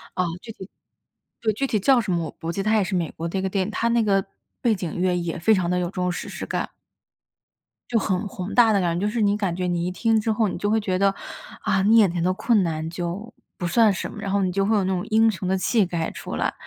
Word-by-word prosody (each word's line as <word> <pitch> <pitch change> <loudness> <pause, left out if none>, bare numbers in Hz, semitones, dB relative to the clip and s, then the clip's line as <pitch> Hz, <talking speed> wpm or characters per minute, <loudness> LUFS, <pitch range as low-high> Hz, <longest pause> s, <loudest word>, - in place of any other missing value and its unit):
啊， 180 - +1 0.2
具 225 - -9
体 190 -2 -11 0.7
对， 220 -2 +1
具 275 +6 -1
体 215 - 0
叫 250 +4 +4
什 200 - -3
么， 170 -2 0
我 155 - -6
不 165 +1 -5
记 195 - -2
它 215 +1 +2
也 205 - +3
是 190 +1 -4
美 170 -3 0
国 165 +1 -5
的 190 +3 -2
一 - - -1
个 190 - -1
电 190 -1 0
影， 215 - -5
它 230 - 0
那 235 -1 +3
个 195 -2 +2 0.4
背 235 -3 +3
景 180 -5 -5
乐 180 -1 +2
也 170 -2 -3
非 220 +6 +4
常 185 -3 +1
地 180 0 +1
有 175 - -1
这 - - -7
种 180 -1 -1
史 175 - -5
诗 - - -6
感。 - - -2 1.2
就 235 - +2
很 205 -1 0
宏 185 +1 -6
大 235 -3 +6
的 200 - +3
感 170 -2 0
觉， 200 - -1
就 - - -1
是 235 - -2
你 205 -1 +3
感 195 -5 -1
觉 180 0 -2
你 175 0 -1
一 - - 0
听 225 +3 +2
之 220 - 0
后 215 0 +2
你 - - -3
就 205 - 0
会 220 +1 +3
觉 190 -3 -1
得， 200 0 +4 0.5
啊， 190 - +1
你 215 +4 +5
眼 210 -5 +6
前 170 -1 -2
的 185 - +2
困 215 +2 +2
难 160 -2 -2
就 175 +6 -5 0.2
不 175 - -4
算 220 +2 +4
什 190 - -4
么。 - - -9
然 195 - -3
后 200 -1 +2
你 180 - 0
就 195 +1 +1
会 220 +2 +2
有 200 - +1
那 190 0 0
种 180 - -2
英 225 +1 +4
雄 185 -2 -5
的 190 +1 +1
气 220 +3 +2
概 165 -2 -2
出 - - -7
来。 - - -1
195 Hz, 315 characters per minute, -23 LUFS, 180-215 Hz, 1.2 s, 大